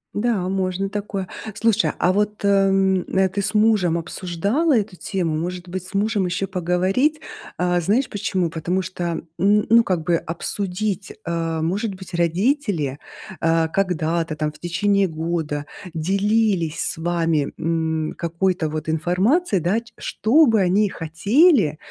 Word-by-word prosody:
Да, 205 Hz, -4 st, 0 dB
можно 190 Hz, 0 st, -1 dB
такое. 200 Hz, -2 st, -4 dB, 0.3 s
Слушай, 225 Hz, +1 st, +2 dB
а 180 Hz, -, +3 dB
вот, 210 Hz, +2 st, -1 dB
м, 195 Hz, -2 st, +3 dB
а 190 Hz, 0 st, +3 dB
ты 200 Hz, +2 st, -2 dB
с 210 Hz, -, -2 dB
мужем 210 Hz, -6 st, +3 dB
обсуждала 195 Hz, -, 0 dB
эту 205 Hz, -4 st, -1 dB
тему? 175 Hz, -4 st, -2 dB
Может 180 Hz, +2 st, -4 dB
быть, 185 Hz, 0 st, -4 dB
с 190 Hz, -, -12 dB
мужем 205 Hz, -1 st, +1 dB
еще 185 Hz, +2 st, -2 dB
поговорить? 185 Hz, -, +1 dB, 0.4 s
А, 180 Hz, 0 st, +1 dB
знаешь 220 Hz, +10 st, +1 dB
почему? 190 Hz, -4 st, -1 dB
Потому 170 Hz, +4 st, -1 dB
что, 175 Hz, -2 st, -3 dB, 0.2 s
н 205 Hz, +4 st, +3 dB
ну, 230 Hz, +1 st, +6 dB
как 180 Hz, -6 st, -1 dB
бы, 170 Hz, +2 st, +2 dB
обсудить, 190 Hz, +4 st, -3 dB
э, 165 Hz, -1 st, -2 dB
может 200 Hz, +6 st, -1 dB
быть, 185 Hz, -1 st, -9 dB
родители, 175 Hz, -, 0 dB, 0.4 s
э, 165 Hz, 0 st, +2 dB
когда-то 165 Hz, -4 st, 0 dB
там 155 Hz, 0 st, -2 dB
в 150 Hz, -, -17 dB
течение 195 Hz, +4 st, +1 dB
года 160 Hz, -3 st, -3 dB, 0.3 s
делились 195 Hz, 0 st, +1 dB
с -, -, -2 dB
вами, 165 Hz, -3 st, 0 dB
м, 160 Hz, -1 st, -1 dB
какой-то, 170 Hz, 0 st, 0 dB
вот, 155 Hz, 0 st, -4 dB
информацией, 185 Hz, -, +1 dB
да, 185 Hz, +7 st, +1 dB
ч 235 Hz, 0 st, -17 dB
что 285 Hz, +7 st, +3 dB
бы 225 Hz, -2 st, +3 dB
они 195 Hz, +3 st, +3 dB
хотели, 195 Hz, -, +3 dB
185 Hz, 145 wpm, -22 LUFS, 165-205 Hz, 0.4 s, ну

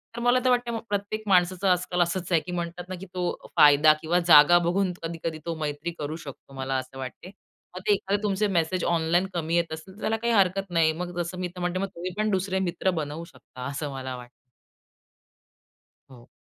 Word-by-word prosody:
तर 235 Hz, -, -5 dB
मला 245 Hz, +1 st, +4 dB
तर 255 Hz, -, +5 dB
वाटतं 245 Hz, -2 st, +1 dB
प्रत्येक 205 Hz, +2 st, -2 dB
माणसाचं 185 Hz, 0 st, +3 dB
आजकाल 180 Hz, 0 st, +1 dB
असंच 175 Hz, +1 st, -1 dB
आहे 165 Hz, -, +5 dB
की 180 Hz, -, -8 dB
म्हणतात 175 Hz, 0 st, -5 dB
ना, 185 Hz, -, -4 dB
की 195 Hz, -, -8 dB
तो 180 Hz, -1 st, -3 dB
फायदा 150 Hz, +1 st, +7 dB
किंवा 170 Hz, +2 st, +1 dB
जागा 155 Hz, +1 st, +8 dB
बघून 185 Hz, +1 st, +1 dB
कधी-कधी 165 Hz, -1 st, -4 dB
तो 170 Hz, -1 st, -2 dB
मैत्री 150 Hz, +2 st, -3 dB
करू 150 Hz, +1 st, -3 dB
शकतो, 140 Hz, 0 st, -11 dB
मला 135 Hz, 0 st, -3 dB
असं 130 Hz, +1 st, -6 dB
वाटतं. 135 Hz, +7 st, -7 dB, 0.5 s
मग -, -, -4 dB
ते 205 Hz, -, +6 dB
एखादे 200 Hz, +1 st, -1 dB
तुमचे 210 Hz, 0 st, +1 dB
मेसेज 170 Hz, +2 st, 0 dB
ऑनलाईन 170 Hz, +3 st, +1 dB
कमी 165 Hz, -1 st, -1 dB
येत 170 Hz, -2 st, +1 dB
असेल, 160 Hz, +4 st, -9 dB
तर 215 Hz, -, -15 dB
त्याला 225 Hz, 0 st, 0 dB
काही 235 Hz, +1 st, 0 dB
हरकत 195 Hz, -1 st, +2 dB
नाही. 165 Hz, -2 st, +3 dB
मग 175 Hz, +1 st, -6 dB
जसं 175 Hz, +2 st, -5 dB
मी 180 Hz, -1 st, -2 dB
म्हणते, 180 Hz, +1 st, -1 dB
मग 195 Hz, -, -1 dB
तुम्ही 180 Hz, +2 st, -4 dB
पण 215 Hz, 0 st, +1 dB
दुसरे 190 Hz, 0 st, 0 dB
मित्र 185 Hz, +2 st, 0 dB
बनवू 150 Hz, +3 st, -5 dB
शकता, 125 Hz, -6 st, -11 dB
असं 145 Hz, +1 st, -4 dB
मला 130 Hz, -1 st, -5 dB
वाटतं. 125 Hz, -1 st, -11 dB, 1.8 s
हो. 120 Hz, -2 st, -15 dB
175 Hz, 200 wpm, -26 LUFS, 155-190 Hz, 1.8 s, जागा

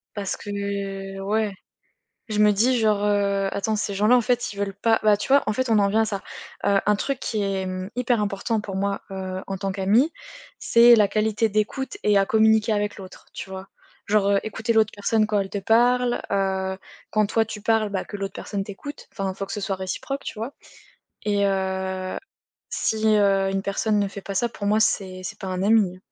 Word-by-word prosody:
Parce 200 Hz, -2 st, -3 dB
que 200 Hz, -1 st, -4 dB
ouais, 210 Hz, +1 st, 0 dB, 0.7 s
je 215 Hz, -2 st, -2 dB
me 210 Hz, 0 st, +6 dB
dis 240 Hz, +5 st, +2 dB
genre: 210 Hz, -2 st, +2 dB
«Heu, 200 Hz, -1 st, +1 dB
attends 215 Hz, +2 st, -1 dB
ces 205 Hz, -1 st, -2 dB
gens 210 Hz, +3 st, +2 dB
-à -, -, +7 dB
en 250 Hz, -, +5 dB
fait, 245 Hz, +1 st, 0 dB
ils 200 Hz, -, -9 dB
veulent 200 Hz, -1 st, -2 dB
pas» 225 Hz, +3 st, +2 dB
bah 210 Hz, -1 st, +5 dB
tu 205 Hz, -, -6 dB
vois 280 Hz, +1 st, +5 dB
en 215 Hz, -, +1 dB
fait 260 Hz, +2 st, -1 dB
on 220 Hz, -, +4 dB
en 200 Hz, -, +3 dB
vient 220 Hz, +3 st, +2 dB
à -, -, +2 dB
ça, 200 Hz, -3 st, -3 dB, 0.4 s
heu 200 Hz, -1 st, +4 dB
un 210 Hz, 0 st, +4 dB
truc 275 Hz, +2 st, -2 dB
qui 215 Hz, -2 st, -2 dB
est, 195 Hz, -1 st, -1 dB
mmh, 185 Hz, 0 st, -4 dB
hyper 245 Hz, -3 st, +1 dB
important 210 Hz, +2 st, -1 dB
pour 200 Hz, -2 st, -6 dB
moi, 200 Hz, +1 st, -1 dB
heu, 185 Hz, -1 st, -4 dB
en 195 Hz, -1 st, -3 dB
tant 195 Hz, 0 st, -2 dB
qu'amie, 210 Hz, -, +2 dB, 0.5 s
c'est 235 Hz, +1 st, +7 dB
la 205 Hz, -1 st, +5 dB
qualité 215 Hz, +2 st, +1 dB
d'écoute 215 Hz, -, -2 dB
et 210 Hz, -1 st, +4 dB
à 195 Hz, -, +3 dB
communiquer 220 Hz, +1 st, +3 dB
avec 205 Hz, 0 st, -1 dB
l'autre, 185 Hz, -1 st, -12 dB
tu 190 Hz, -, -7 dB
vois? 190 Hz, 0 st, -8 dB, 0.4 s
Genre, 205 Hz, -1 st, +3 dB
heu, 200 Hz, 0 st, +4 dB
écouter 220 Hz, +1 st, -2 dB
l'autre 220 Hz, -1 st, +3 dB
personne 215 Hz, +2 st, +1 dB
quand 210 Hz, -1 st, 0 dB
elle 195 Hz, -1 st, -2 dB
te 200 Hz, -, -3 dB
parle, 240 Hz, +4 st, +3 dB
heu, 190 Hz, -1 st, 0 dB, 0.3 s
quand 215 Hz, 0 st, +3 dB
toi 225 Hz, +1 st, +1 dB
tu 215 Hz, -1 st, -8 dB
parles 220 Hz, -1 st, +2 dB
bah 195 Hz, -2 st, -2 dB
que 205 Hz, -, -8 dB
l'autre 195 Hz, -1 st, -4 dB
personne 200 Hz, -2 st, -4 dB
t'écoute, 210 Hz, +9 st, -9 dB
enfin, 195 Hz, -2 st, -3 dB
faut 195 Hz, +1 st, -5 dB
que -, -, -7 dB
ce 210 Hz, -, -4 dB
soit 195 Hz, -1 st, -2 dB
réciproque, 230 Hz, +9 st, -4 dB
tu -, -, -6 dB
vois? 230 Hz, +6 st, -5 dB, 0.7 s
Et 205 Hz, -1 st, +1 dB
heu, 190 Hz, -1 st, -2 dB, 0.5 s
si, 220 Hz, 0 st, 0 dB
heu, 200 Hz, -2 st, +3 dB
une 195 Hz, 0 st, -1 dB
personne 205 Hz, +2 st, 0 dB
ne 200 Hz, -, +1 dB
fait 200 Hz, 0 st, -8 dB
pas 195 Hz, 0 st, -6 dB
ça 235 Hz, +4 st, +1 dB
pour 205 Hz, -2 st, -5 dB
moi, 210 Hz, +1 st, +3 dB
c'est 185 Hz, -3 st, 0 dB
c'est 165 Hz, -, -7 dB
pas 190 Hz, -, -6 dB
un 185 Hz, 0 st, -2 dB
ami. 200 Hz, -4 st, +3 dB
205 Hz, 220 wpm, -24 LUFS, 195-220 Hz, 0.7 s, à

